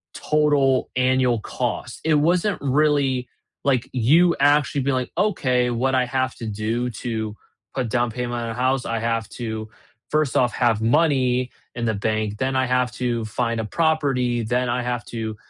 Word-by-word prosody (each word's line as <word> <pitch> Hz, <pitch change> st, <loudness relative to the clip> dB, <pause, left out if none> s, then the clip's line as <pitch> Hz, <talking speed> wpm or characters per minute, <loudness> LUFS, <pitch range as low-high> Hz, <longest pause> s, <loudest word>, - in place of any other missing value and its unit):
total 145 Hz, -3 st, +2 dB
annual 125 Hz, -2 st, +2 dB
cost?" 120 Hz, +1 st, -4 dB
It 160 Hz, -1 st, +3 dB
wasn't 175 Hz, +6 st, +2 dB
really 140 Hz, -2 st, +1 dB, 0.4 s
like, 130 Hz, -4 st, +1 dB
you 160 Hz, +9 st, +4 dB
actually 145 Hz, 0 st, +3 dB
be, 140 Hz, -, 0 dB
like, 130 Hz, -1 st, -2 dB
"Okay, 130 Hz, -12 st, +1 dB
what 130 Hz, +3 st, 0 dB
I 125 Hz, -, +3 dB
have 130 Hz, +1 st, -1 dB
to 115 Hz, -, -7 dB
do 110 Hz, +4 st, -2 dB
to 110 Hz, -3 st, -3 dB, 0.4 s
put 125 Hz, -3 st, -2 dB
down 120 Hz, +2 st, +1 dB
payment 120 Hz, +1 st, -3 dB
on 115 Hz, -, -4 dB
a -, -, -3 dB
house? 130 Hz, +2 st, 0 dB
I 115 Hz, -1 st, -2 dB
have 115 Hz, -1 st, -1 dB
to 110 Hz, -1 st, -4 dB, 0.4 s
first 155 Hz, -3 st, +1 dB
off 125 Hz, -1 st, +2 dB
have 115 Hz, -3 st, +1 dB
money 130 Hz, -1 st, +2 dB, 0.3 s
in 120 Hz, -, -4 dB
the 110 Hz, -, +1 dB
bank, 110 Hz, 0 st, -1 dB
then 130 Hz, +2 st, -1 dB
I 130 Hz, -1 st, +2 dB
have 125 Hz, -1 st, +1 dB
to 120 Hz, -2 st, -2 dB
find 115 Hz, +2 st, -2 dB
a 110 Hz, -, -2 dB
property, 135 Hz, -5 st, +1 dB
then 125 Hz, +3 st, 0 dB
I 125 Hz, +1 st, 0 dB
have 120 Hz, -1 st, -2 dB
to 110 Hz, -2 st, -5 dB
125 Hz, 175 wpm, -22 LUFS, 115-135 Hz, 0.4 s, you